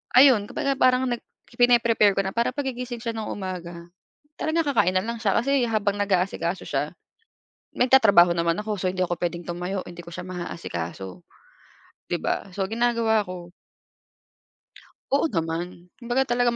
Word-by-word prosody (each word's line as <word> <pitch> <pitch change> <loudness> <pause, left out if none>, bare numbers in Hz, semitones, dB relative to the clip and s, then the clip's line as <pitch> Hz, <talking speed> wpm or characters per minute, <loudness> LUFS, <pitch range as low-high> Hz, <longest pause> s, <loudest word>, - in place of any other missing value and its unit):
ayun 255 -6 +7
kumbaga 275 -3 -1
parang 255 0 +3
nag 240 - -2 0.3
pine-prepare 235 -4 +4
ko 195 - +1
na 190 - -5
para 235 +2 +1
paggigising 250 -3 -4
siya 230 -1 -3
ng 215 - -4
umaga, 175 -3 -6 0.5
talaga 315 0 0
kakain 220 -8 +3
na 185 - +3
lang 230 +3 -4
siya. 215 -3 0
Kasi 275 +1 +1
habang 210 -3 0
nag-aasikaso 190 -3 -1
siya, - - -1 0.8
nagtatrabaho 220 -9 +6
naman 170 0 +2
ako, 210 -1 -3
so 185 - -4
hindi 185 0 -2
ako 175 -1 0
puwedeng 175 0 -2
tumayo, 180 +3 -4
hindi 175 0 -11
ko 170 - -10
siya 180 - -5
maaasikaso, 95 - -6 0.9
'di - - -1
ba, - - -2
so 195 - -2
ginagawa 230 -2 +2
ko 175 -1 -8 1.6
Oo 285 +4 +3
naman, 170 - -4
kumbaga 245 +2 +1
talaga 240 -1 +1
205 Hz, 150 wpm, -25 LUFS, 180-240 Hz, 1.6 s, ayun